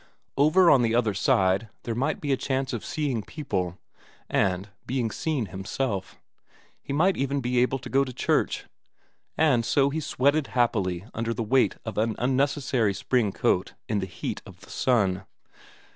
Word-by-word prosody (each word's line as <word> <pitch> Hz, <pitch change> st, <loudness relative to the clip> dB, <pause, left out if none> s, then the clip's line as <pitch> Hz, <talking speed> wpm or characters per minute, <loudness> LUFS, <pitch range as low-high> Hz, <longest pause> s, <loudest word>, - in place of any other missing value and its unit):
Over 155 Hz, +6 st, +5 dB
on 135 Hz, -, +6 dB
the 115 Hz, -1 st, +2 dB
other 115 Hz, -4 st, +2 dB
side 95 Hz, +2 st, +2 dB
there 115 Hz, -, -2 dB
might 135 Hz, +7 st, -1 dB
be 145 Hz, -, -2 dB
a -, -, +4 dB
chance 130 Hz, 0 st, -2 dB
of 115 Hz, -, -3 dB
seeing 140 Hz, -7 st, -2 dB
people, 95 Hz, -, -3 dB, 0.5 s
and 95 Hz, +1 st, +1 dB, 0.2 s
being 125 Hz, -4 st, -1 dB
seen 150 Hz, -4 st, -1 dB
himself; 95 Hz, +1 st, -3 dB, 0.6 s
he -, -, -7 dB
might 175 Hz, +7 st, +3 dB
even 140 Hz, +1 st, 0 dB
be 125 Hz, -1 st, 0 dB
able 125 Hz, +2 st, +2 dB
to 130 Hz, -, -9 dB
go 135 Hz, +1 st, +3 dB
to 130 Hz, -, -5 dB
church. -, -, 0 dB, 0.7 s
And 140 Hz, -7 st, +3 dB
so 140 Hz, +4 st, +2 dB
he 160 Hz, -, -1 dB
sweated 145 Hz, 0 st, +1 dB
happily 100 Hz, -7 st, +1 dB
under 115 Hz, 0 st, -2 dB
the 115 Hz, -, -2 dB
weight 130 Hz, +4 st, +3 dB
of 110 Hz, -2 st, -3 dB
an 110 Hz, 0 st, +1 dB
unnecessary 130 Hz, -4 st, +1 dB
spring 110 Hz, 0 st, +1 dB
coat -, -, 0 dB
in 105 Hz, -2 st, 0 dB
the 95 Hz, -, -3 dB
heat 90 Hz, -, -5 dB
of -, -, -14 dB
the -, -, -14 dB
sun. 100 Hz, -7 st, +1 dB
125 Hz, 170 wpm, -26 LUFS, 105-140 Hz, 0.7 s, on